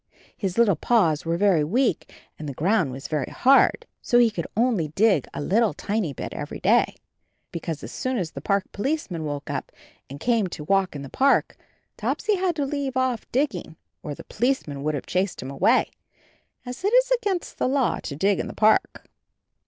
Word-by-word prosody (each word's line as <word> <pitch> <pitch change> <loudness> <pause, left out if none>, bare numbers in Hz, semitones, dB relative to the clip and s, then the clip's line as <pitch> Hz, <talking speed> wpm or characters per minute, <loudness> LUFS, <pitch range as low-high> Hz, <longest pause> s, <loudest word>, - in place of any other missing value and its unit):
His 190 -3 -3
little 225 -6 +4
paws 170 -11 +2
were 165 0 +1
very 190 -5 +3
weak 230 - 0 0.3
and 150 -1 -5
the 135 - -7
ground 180 - +1
was 135 +2 -7
very 150 -4 -2
hard, 270 +2 +4 0.2
so 240 - +2
he 240 -2 +5
could 170 -6 -4
only 225 -9 +2
dig 190 - +2
a - - -6
little 210 +8 +1
tiny 205 -6 -2
bit 135 - -6
every - - -6
day, - - +3 0.6
because 165 -2 -5
as - - -7
soon 255 0 -2
as 175 -6 -2
the - - -8
Park 200 -1 +1
Policeman 205 - -2
woke 145 -1 -4
up - - -4 0.4
and 140 +1 -8
came 230 0 +1
to 155 -3 -7
walk 195 +1 +1
in 140 - -6
the 135 - -8
park, 275 - +2 0.4
Topsy 425 - 0
had 365 -2 0
to 290 -3 -1
leave 275 -2 -3
off 255 -3 -1
dig 275 +2 +2
ging 170 -3 -8 0.3
or 145 - -5
the - - -10
Policeman 220 - -1
would 155 +1 -1
have 140 - -5
chased 185 +1 -1
him 130 - -6
away 140 - +2 0.4
— - - -39
as 250 +6 -7
it 405 - +2
is - - +4
against 410 -8 -1
the - - +2
law 265 -1 +1
to 140 - -6
dig 195 +6 +1
in - - -2
the - - -8
park. 215 - +2
200 Hz, 200 wpm, -24 LUFS, 155-255 Hz, 0.6 s, he